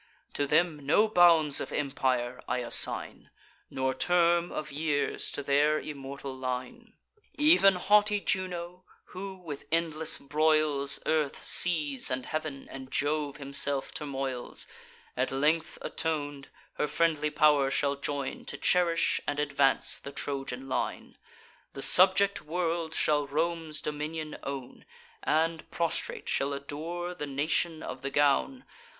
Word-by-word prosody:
To 145 - -1
them 160 -2 +1
no 185 +10 +3
bounds 170 -7 +4
of - - -5
empire 130 -3 -1
I 125 - 0
assign, 120 -1 +1 0.4
Nor 130 0 -1
term 170 +4 +2
of 150 -1 -5
years 145 0 -1
to 145 - -5
their 145 +2 +3
immortal 140 -2 -7
line. 125 -1 -5 0.5
Ev'n 295 - +6
haughty 205 +3 +3
Juno, 180 -2 -3 0.3
who, 190 +1 -6
with 160 -6 -8
endless 160 -1 +1
broils, 150 -1 +2
Earth, 155 -3 0
seas, 150 -6 +3
and 130 0 -2
heav'n, 155 -3 -5
and 130 -1 -9
Jove 145 +1 -1
himself 140 -1 0
turmoils; 135 -4 -4 0.5
At 130 +1 0
length 150 +4 0
aton'd, 145 -3 -3 0.3
her - - +1
friendly 150 0 +1
pow'r 150 -2 +3
shall 140 +1 0
join, 140 -1 -4
To - - -4
cherish 170 -2 +2
and 145 - -1
advance 140 -2 +1
the 140 - -9
Trojan 135 -2 -4
line. 130 - -3 0.6
The 135 - -1
subject 195 +2 +5
world 165 0 -2
shall 145 -2 +1
Rome's 160 0 -2
dominion 155 +1 -4
own, 135 -2 -7 0.4
And, 160 +1 0
prostrate, 170 -1 -2
shall 140 +1 0
adore 160 +6 -5
the 150 -5 -6
nation 155 +3 0
of 130 - -7
the 140 - -3
gown. 145 - +1
150 Hz, 130 wpm, -29 LUFS, 140-165 Hz, 0.6 s, Ev'n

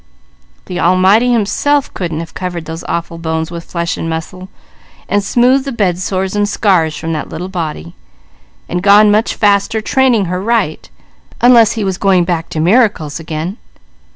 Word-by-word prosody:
The 180 -1 -5
Almighty 190 +8 +3
Himself 265 +6 0
couldn't 165 -3 -4
have 165 - -10
covered 175 -3 -5
those 160 +1 -7
awful 170 0 -4
bones 160 0 -3
with 170 -1 -7
flesh 170 -1 -3
and 165 - -4
muscle, 185 +3 -6 0.6
and 205 0 0
smoothed 250 +6 +2
the 275 - -5
bed 190 -7 0
sores 190 +1 -2
and 205 0 +1
scars 180 -8 +1
from 165 0 -4
that 155 - -4
little 180 +3 -6
body; 155 - -5 0.7
and 180 +1 -2
gone 205 +2 +6
much 215 +2 +1
faster 205 +1 +2
training 240 -2 +2
her 180 +1 -3
right, 215 -7 -1 0.5
unless 235 -2 +5
He 220 - -3
was 190 -2 -2
going 190 -3 +3
back 170 -2 -2
to 155 - -4
miracles 180 - +1
again. 160 +5 -5
185 Hz, 165 wpm, -14 LUFS, 165-210 Hz, 0.7 s, gone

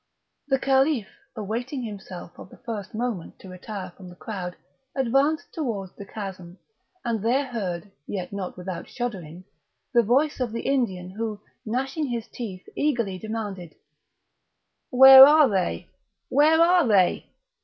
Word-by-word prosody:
The 270 -2 +2
Caliph, 270 -4 +2 0.3
awaiting 240 +5 -4
himself 195 -5 -8
of - - -11
the - - -15
first 215 -2 -7
moment 225 -7 -4
to 190 - -13
retire 185 0 -7
from 185 -2 -12
the 175 - -13
crowd, 180 -3 -6 0.4
advanced 275 +4 +1
towards 215 - -4
the 200 - -10
chasm, 190 -4 -8 0.5
and 230 -3 -1
there 260 +5 +2
heard, 205 -6 -5 0.2
yet 185 -1 -5
not 195 -3 -5
without 180 -1 -6
shuddering, 185 -9 -5 0.5
the 240 - +6
voice 270 +8 +1
of 245 -3 -2
the 230 - -4
Indian, 190 -10 -1
who, 215 +1 -4 0.3
gnashing 270 +6 -2
his 235 -2 -4
teeth, 205 -6 -8
eagerly 235 -10 -1
demanded: 205 -6 -6 1.1
"Where 265 +1 +10
are 300 +1 +7
they? 190 -6 -1 0.4
where 310 +3 +4
are 340 -3 +5
they? 195 -5 +3
225 Hz, 140 wpm, -25 LUFS, 190-265 Hz, 1.1 s, Where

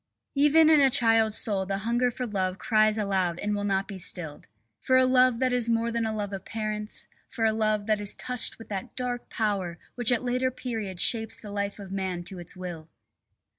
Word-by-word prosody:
Even 295 +3 +5
in 310 - +6
a 270 - +6
child's 225 -3 +3
soul 200 -3 0
the 195 0 -1
hunger 235 +4 +1
for 250 +1 -4
love 190 -4 -2
cries 215 -1 +2
aloud 190 -5 0
and 210 +3 -2
will 205 - -3
not 195 -1 0
be 195 -3 -7
stilled. 165 -4 -4 0.3
For 260 - +3
a 260 - +6
love 255 -1 +4
that 255 0 +1
is 240 -2 0
more 230 0 +1
than 230 -1 -1
a - - -2
love 205 -2 -4
of 195 - -5
parents, 215 -1 -4 0.2
for 225 - -1
a 220 - +3
love 215 -1 0
that 215 -1 +1
is 205 - -1
touched 250 -2 0
with 225 - -12
that 195 -2 -5
dark 245 -1 -2
power 195 -6 -1 0.2
which 245 -1 +2
at 240 - +2
a - - -11
later 250 +1 0
period 225 -7 -5
shapes 225 +1 +3
the 210 - -9
life 200 0 -3
of 200 -2 -10
man 190 -3 -3
to 185 +1 -8
its 175 +2 -7
will. 170 -3 -7
215 Hz, 220 wpm, -27 LUFS, 195-240 Hz, 0.3 s, in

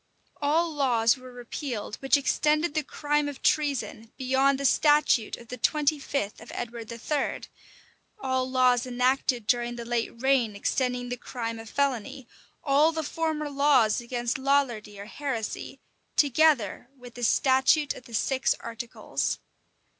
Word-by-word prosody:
All 320 +3 +1
laws 240 -5 +3
were 255 -1 -12
repealed 245 -2 -5
which 270 +2 +3
extended 300 +3 +1
the 310 - +1
crime 295 +1 -1
of 280 - -10
treason 240 -7 0
beyond 265 +1 +2
the 280 - -2
statute 295 -6 +3
of 235 -1 -15
the 250 - -6
twenty 300 -1 +2
fifth 275 -8 -3
of 225 - -11
Edward 235 -1 -6
III.;[] 270 +5 -2 0.8
all 260 -7 -1
laws 255 -1 +3
enacted 250 -1 +1
during 240 +1 +1
the 235 -1 -7
late 235 -1 -1
reign 255 -6 +2
extending 250 +3 -1
the 245 - -3
crime 230 -2 -5
of 225 -1 -9
felony; 270 -1 -2 0.4
all 295 +3 +4
the 320 -1 -3
former 315 0 -2
laws 275 -6 +3
against 240 +1 -3
Lollardy 255 -7 0
or 200 - -7
heresy, 230 -2 -5 0.4
together 280 -6 +3
with 245 -1 -12
the 245 - -8
statute 265 +4 +3
of 255 - -13
the 235 -3 -7
six 265 +4 +1
articles. 230 +1 -3
260 Hz, 145 wpm, -27 LUFS, 235-285 Hz, 0.8 s, all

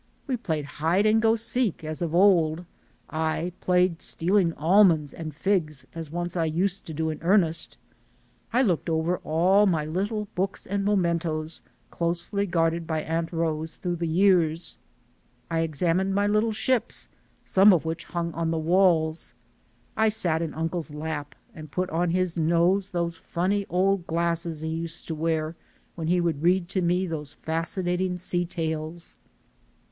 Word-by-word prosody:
We 265 - -1
played 160 - -3
hide 165 +7 0
and 220 +1 +4
go 225 0 +4
seek 230 -4 -1
as 155 +1 -5
of 170 -1 -1
old; 175 -3 +4 0.5
I 160 +2 -1
played 180 -2 +2
stealing 180 0 +1
almonds 165 -3 +4
and 160 -2 -6
figs 155 -3 -1
as 165 -2 -6
once 175 +2 -4
I 165 -2 +1
used 180 +5 -1
to 160 - -6
do 160 +1 -1
in 155 - -7
earnest; 170 -2 +1 0.7
I 250 +3 +3
looked 180 -6 0
over 165 +2 +1
all 185 +6 +3
my 160 -5 +1
little 205 +6 -2
books 195 +1 -2
and 200 +1 -2
mementoes, 170 -5 0 0.3
closely 175 +4 -1
guarded 165 -1 0
by 160 -1 -1
Aunt 165 +1 -2
Rose 160 -1 -2
through 180 - -4
all 175 - -2
the 170 0 -2
years; 170 -2 +2 0.7
I 165 - +1
examined 170 +4 0
my 200 0 +2
little 215 +2 +2
ships, 240 +2 0 0.4
some 195 +2 +6
of 170 -4 +2
which 160 +1 -4
hung 170 -1 -3
on 165 +1 -1
the 165 - 0
walls; 160 -3 +2 0.6
I 220 +1 +3
sat 175 -7 0
in 165 -2 -4
uncle's 165 +1 -2
lap 150 -2 -5 0.2
and 155 -1 -10
put 185 +4 -2
on 170 +2 +1
his 180 0 0
nose 170 +4 +2
those 170 -2 -2
funny 195 +5 -1
old 185 0 +1
glasses 170 -1 -1
he 160 - -3
used 165 0 -3
to - - -1
wear 160 0 -1 0.4
when 160 -2 -5
he 180 +1 +3
would 165 -4 -1
read 175 +1 +2
to 190 -1 0
me 180 +2 +1
those 150 -4 -5
fasci 165 +4 -2
nating 180 +1 0
sea 175 -1 -1
tales. 160 0 -4
170 Hz, 165 wpm, -26 LUFS, 160-185 Hz, 0.7 s, some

